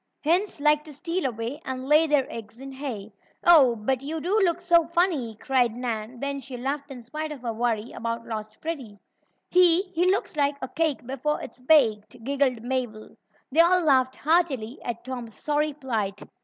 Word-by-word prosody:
Hens 350 +4 +1
like 300 +1 +3
to 300 -2 -11
steal 340 +1 -2
away, 235 +4 -5
and 260 0 -5
lay 305 +2 +5
their 290 -3 +3
eggs 225 +1 -9
in 270 +1 -8
hay." 250 -7 -6 0.3
"Oh, 285 -9 +7
but 245 +4 -1
you 310 +4 -4
do 375 +7 +1
look 345 -2 +1
so 340 -2 +3
funny!" 330 - 0
cried 245 0 +1
Nan, 235 -1 -4
then 280 +1 -3
she 265 -2 -8
laughed 280 +3 -3
in 255 -3 -9
spite 305 +6 -5
of 275 -4 -8
her 230 -2 -2
worry 230 0 -1
about 230 0 -4
lost 215 -1 -6
Freddie. 270 -11 -5 0.5
"He 360 0 +6
he 355 +2 +2
looks 390 -3 0
like 285 -1 +1
a 260 - -5
cake 315 -6 -1
before 270 +4 -2
it's 235 - -10
baked!" 235 -5 +2
giggled 265 -3 0
Mabel. 245 -4 -4 0.4
They 310 - +1
all 360 +2 +6
laughed 260 -4 +3
heartily 285 -7 0
at 235 -1 -5
Tom's 245 -4 -6
sorry 300 0 0
plight. 225 -8 -3
270 Hz, 185 wpm, -25 LUFS, 235-310 Hz, 0.5 s, Oh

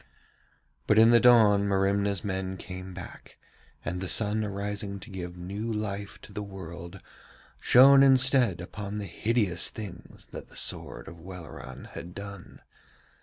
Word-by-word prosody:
But 105 - +3
in 115 +1 +7
the 120 - +7
dawn 110 -5 +5
Merimna's 100 0 +1
men 95 -1 -3
came 90 +1 -8
back, 90 -1 -11 0.5
and 90 +1 -3
the 95 - -3
sun 110 0 +3
arising 100 0 -4
to 110 - -12
give 90 -2 -7
new 100 +6 -5
life 100 -2 -4
to 105 - -13
the 105 - -4
world, 85 -4 -9 0.6
shone 135 +2 +7
instead 130 -8 +4
upon 100 +3 -6
the 105 - -4
hideous 100 -2 0
things 100 -7 -10
that - - -9
the - - -13
sword - - -1
of 85 - -11
Welleran 85 -7 -10
had 90 +1 -9
done. 100 -2 -10
100 Hz, 145 wpm, -28 LUFS, 90-105 Hz, 0.6 s, in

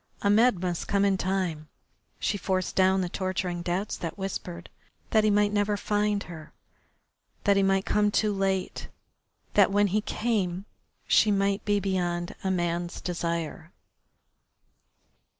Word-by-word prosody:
Ahmed 205 0 +4
must 180 -2 -3
come 200 0 +2
in 195 -1 +3
time. 185 -5 -2 0.5
She - - -1
forced 185 -2 -2
down 190 0 +4
the 180 - -1
torturing 185 -1 -2
doubts 180 +4 -2
that 165 +2 -5
whispered 180 -3 -6 0.4
that 220 -1 +4
he 215 - +3
might 205 0 +2
never 205 0 +1
find 210 0 0
her, 160 -3 -11 0.9
that 200 -1 +4
he 195 - +3
might 195 0 +2
come 210 0 +2
too 210 0 +1
late, 195 -1 -1 0.7
that 200 -2 +5
when 205 +1 +3
he 215 - +2
came 200 -5 -1 0.4
she 215 - +4
might 200 0 +1
be 205 -1 +2
beyond 175 -3 -2
a 190 - 0
man's 175 -1 -1
desire. 170 -2 -3
195 Hz, 140 wpm, -27 LUFS, 175-205 Hz, 0.9 s, that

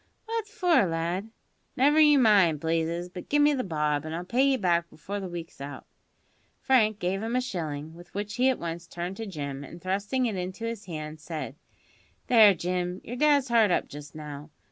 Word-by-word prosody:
"What 450 -1 -3
for, 360 - +3
lad?" 170 +5 -2 0.5
"Never 290 +4 +4
you 300 -2 +7
mind, 200 - +5
Blazes; 165 +2 -1
but 180 0 -10
give 295 0 +4
me 295 0 +5
the 260 -2 -1
bob, 150 -4 0
an' 155 0 -5
I'll 175 +2 -4
pay 240 +7 +1
you 275 -1 +4
back 170 -5 +1
before 195 +6 -6
the 190 - -5
week's 170 -4 -8
out." 140 +1 -7 0.7
Frank 220 -6 +3
gave 190 +1 -1
him 225 +2 -2
a - - +3
shilling, 160 - -4
with 175 +1 -14
which 205 0 -3
he 255 +2 +4
at 260 - +1
once 170 0 -5
returned 175 +3 -5
to 225 - -5
Jim, 140 -6 -5
and 170 +5 -10
thrusting 200 +8 -1
it 220 -4 -1
into 185 +5 -4
his 230 -2 -5
hand, 155 -3 -6
said: 150 -4 -6 0.7
"There, 215 -5 +7
Jim, 180 +1 -2
your 245 - -6
dad's 285 -1 +3
hard 230 -3 +5
up 180 - +1
just 145 +1 -10
now. 150 0 -8
185 Hz, 200 wpm, -27 LUFS, 165-235 Hz, 0.7 s, you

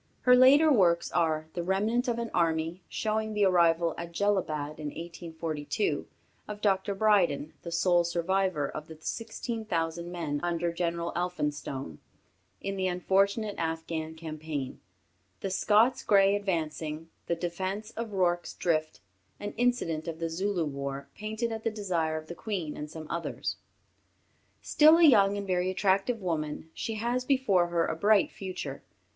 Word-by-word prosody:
Her 250 0 +6
later 280 +5 +7
works 170 -7 +3
are 155 -2 +1
"The 175 - -2
Remnant 210 +8 0
of 240 -1 0
an 235 -1 -3
Army," 165 +1 0
showing 220 0 -1
the 205 -1 +3
arrival 170 -3 +3
at 170 0 -6
Jellalabad, 155 -7 -1
in 150 - -4
1842, 165 - -3 0.4
of 210 0 -6
Dr. 200 -1 +1
Brydon, 185 -8 +2
the 170 - -7
sole 175 +1 +3
survivor 170 -2 0
of 155 +2 -7
the 160 - -10
sixteen 225 +4 -4
thousand 170 -3 -2
men 160 -5 -2
under 170 -1 -1
General 170 0 -2
Elphinstone, 145 - -3 0.6
in 195 0 -3
the 190 0 0
unfortunate 195 +4 +1
Afghan 160 -1 -3
campaign; 155 -4 -5 0.6
the 195 - -3
"Scots 225 +7 +3
Greys 200 0 +4
Advancing," 160 -4 -3 0.2
"The 170 - +1
Defence 185 +5 -4
of 230 -2 -5
Rorke's 175 -2 0
Drift," 155 -3 -1 0.4
an 205 - -5
incident 235 -11 0
of 165 -1 -4
the 165 0 -3
Zulu 185 0 0
War, 140 -1 -5
painted 220 +2 -3
at 220 0 -5
the - - +1
desire 175 -7 -1
of 155 - -7
the 170 - -7
Queen 175 -5 -4
and 150 - -6
some 160 0 -8
others. 170 0 -3 1.1
Still 310 +2 +6
a 340 - +4
young 205 -9 +6
and 200 - -4
very 180 -1 0
attractive 195 +4 +1
woman, 160 -2 -3
she 225 - -4
has 240 +3 -1
before 250 -10 +3
her 170 -1 +1
a - - -2
bright 205 +4 +3
future. 190 -2 -6
175 Hz, 150 wpm, -29 LUFS, 160-205 Hz, 1.1 s, later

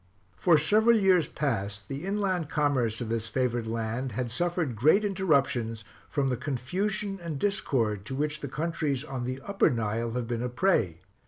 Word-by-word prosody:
For 170 - +4
several 215 +9 +4
years 190 -5 +4
past 100 -8 -2
the 140 +5 -5
inland 190 -6 0
commerce 130 -7 +1
of 115 - -3
this 115 -1 -1
favored 120 -2 -1
land 115 +2 -2
had 120 +1 -2
suffered 170 -2 -1
great 155 - +4
interruptions 140 - +1 0.3
from 140 -2 0
the 125 - 0
confusion 190 - -2
and 165 -4 -4
discord 120 - 0
to 130 - -4
which 150 +2 -1
the 145 - -5
countries 150 -2 -2
on 135 -5 -4
the 130 +1 -3
Upper 200 +5 +2
Nile 115 0 -1
have 125 -1 -2
been 120 -1 -2
a 125 - -1
prey. 120 - +1
135 Hz, 170 wpm, -28 LUFS, 115-170 Hz, 0.3 s, For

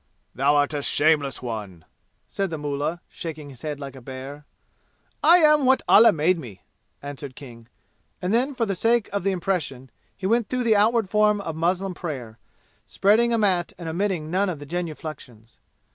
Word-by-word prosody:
"Thou 140 +3 +2
art 145 +1 +2
a 145 - -2
shameless 145 -2 +2
one!" 105 -8 -6 0.4
said 195 -1 -2
the 160 - -4
mullah, 145 +3 -3
shaking 155 -3 -8
his 130 - -14
head 150 -2 -4
like 135 -2 -8
a 130 - -11
bear. 135 +3 -9 0.7
"I 335 +4 +7
am 300 -3 +5
what 260 +1 +3
Allah 225 +3 +8
made 165 +3 +1
me!" 105 - -11 0.4
answered 140 -2 -7
King, 120 -5 -12 0.5
and 180 +3 -2
then, 260 +4 +1
for 235 - 0
the 200 - -1
sake 230 +4 +1
of 200 - -1
the 195 - +1
impression, 155 -9 -3 0.3
he 190 - -6
went 230 +2 +1
through 255 -1 -1
the 225 -2 +3
outward 220 +1 +3
form 210 +1 +3
of 165 -5 -5
muslim 180 +3 0
prayer, 130 -11 -7 0.5
spreading 225 +4 +3
a 230 - +2
mat 185 -5 +1
and 170 -1 -7
omitting 170 -2 -2
none 195 +2 +1
of 175 - -4
the 145 - -10
genuflections. 155 -8 -7
165 Hz, 180 wpm, -24 LUFS, 140-205 Hz, 0.7 s, Allah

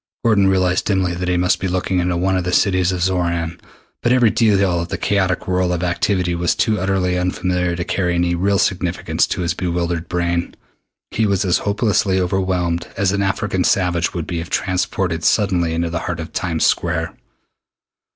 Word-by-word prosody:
Gordon 105 -4 +4
realized 95 -1 +1
dimly 95 -3 +1
that 90 +1 -4
he 90 - +1
must 90 +1 +2
be 95 - -2
looking 90 0 -1
into 90 0 0
one 95 +2 +1
of 90 - 0
the 90 - -2
cities 95 -1 +2
of 90 -2 -2
Xoran, 85 -2 -1 0.4
but 120 - +1
every 125 -3 +4
detail 100 -6 +2
of 85 - -4
the - - -4
chaotic 95 -3 0
whirl 90 -1 +1
of 90 0 -2
activity 90 0 0
was 85 0 0
too 110 -2 +1
utterly 90 -1 0
unfamiliar 90 -1 -1
to 85 - -3
carry 90 -1 -1
any 85 0 +1
real 100 +3 +1
significance 95 -3 0
to - - -3
his 85 -1 0
bewildered 85 -1 -2
brain. 85 -1 -1 0.6
He 110 -1 +1
was 100 0 +1
as 90 - +2
hopelessly 100 -2 +1
overwhelmed 90 -2 -1
as 100 -2 +2
an 100 0 0
African 95 -1 0
savage 90 -3 +1
would 85 -3 -3
be 85 -2 -3
if 85 +2 -6
transported 90 -2 -1
suddenly 90 -5 +2
into 85 0 -1
the 85 - -2
heart 85 -1 -4
of 80 +1 -7
Times 85 -3 0
Square. - - 0
90 Hz, 190 wpm, -19 LUFS, 85-95 Hz, 0.6 s, Gordon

